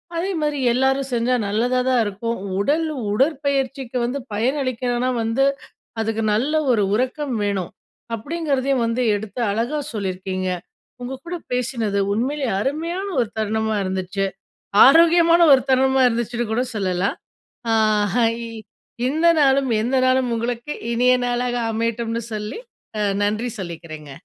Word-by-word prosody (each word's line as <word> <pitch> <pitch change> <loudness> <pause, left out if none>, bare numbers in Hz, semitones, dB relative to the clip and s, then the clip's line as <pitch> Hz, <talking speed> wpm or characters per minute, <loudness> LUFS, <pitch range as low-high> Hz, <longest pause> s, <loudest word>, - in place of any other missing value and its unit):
அதே 355 +4 -1
மாதிரி 295 -1 0 0.2
எல்லாரும் 265 +2 +1
செஞ்சா 240 +1 +1
நல்லதாக 250 +5 +1
இருக்கும். 220 +3 -3 0.2
உடல் 300 +10 +1 0.3
உடற்பயிற்சிக்கு 270 -1 0
வந்து 255 +4 -2
பயனளிக்கணுனா 250 +1 0
வந்து, 225 +4 +1 0.6
அதுக்கு 225 0 -1
நல்ல 255 +8 0 0.2
ஒரு 215 -3 +2
உறக்கம் 260 +3 -1
வேணும். 200 -3 -2 0.4
அப்டிங்றதையும் 275 -1 -1
வந்து 230 +2 -1
எடுத்து 215 +3 -6
அழகா 235 +8 -1
சொல்லிருக்கீங்க. 185 -2 -3 0.5
உங்க 260 +2 -5
கூட 350 +1 -3 0.2
பேசினது 235 -5 -1
உண்மையிலேயே 260 +4 -1
அருமையான 335 - -2
ஒரு 235 - 0
தருணமா 220 0 0
இருந்துச்சு. 190 +1 -2 0.6
ஆரோக்கியமான 335 +3 +6
ஒரு 265 - +5
தருணமா 265 0 +3
இருந்துச்சுன்னு 235 0 -2
கூட 245 +3 +1
சொல்லலாம். 190 -1 -1 0.6
ஆ - - +4 0.4
ஹை 230 -2 +3 0.8
இந்த 315 +5 +1
நாளும் 270 -2 +3
எந்த 250 +4 0
நாளும் 255 -1 +2
உங்களுக்கு 235 +4 -3 0.2
இனிய 250 +2 +4
நாளாக 245 0 -1 0.2
அமையட்டும்னு 230 +1 -2
சொல்லி 210 - -4 0.4
அ - - -1 0.2
நன்றி 215 +4 0
சொல்லிக்கிறேங்க. 165 -5 -8
245 Hz, 120 wpm, -21 LUFS, 220-270 Hz, 0.8 s, ஆரோக்கியமான